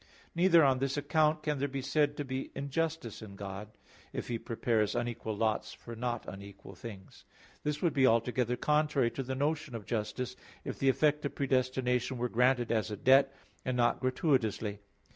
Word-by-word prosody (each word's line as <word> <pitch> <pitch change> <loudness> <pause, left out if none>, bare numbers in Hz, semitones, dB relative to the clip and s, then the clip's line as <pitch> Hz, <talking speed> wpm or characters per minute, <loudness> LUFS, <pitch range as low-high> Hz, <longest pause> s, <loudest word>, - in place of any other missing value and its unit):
Neither 170 -1 +6
on 135 -2 +4
this 135 +1 -1
account 155 +1 +2
can 150 -2 -1
there 140 - +1
be 135 -1 -4
said 145 +1 +1
to 145 - -3
be 130 0 -4
injustice 140 -2 -2
in 100 -2 -9
God, 100 +1 -6 0.5
if - - -4
He 115 -1 -1
prepares 115 -2 0
unequal 120 -3 -2
lots 110 0 0
for 115 - -9
not 120 0 -3
unequal 100 0 -9
things. 95 0 -10 0.4
This 150 +2 -2
would 170 - +3
be 135 -2 +5
altogether 120 +1 +2
contrary 150 -4 +2
to - - -4
the 130 0 -3
notion 145 -1 -1
of 110 -3 -6
justice, 120 +3 -3 0.3
if - - -5
the 135 - +3
effect 150 +2 +2
of 140 - -3
predestination 130 -1 0
were 120 +1 -1
granted 125 0 +2
as 110 -2 +1
a 105 - -4
debt, 135 +3 +5 0.3
and 130 -1 -1
not 120 -1 +3
gratuitously. 115 -6 0
130 Hz, 180 wpm, -32 LUFS, 115-140 Hz, 0.5 s, Neither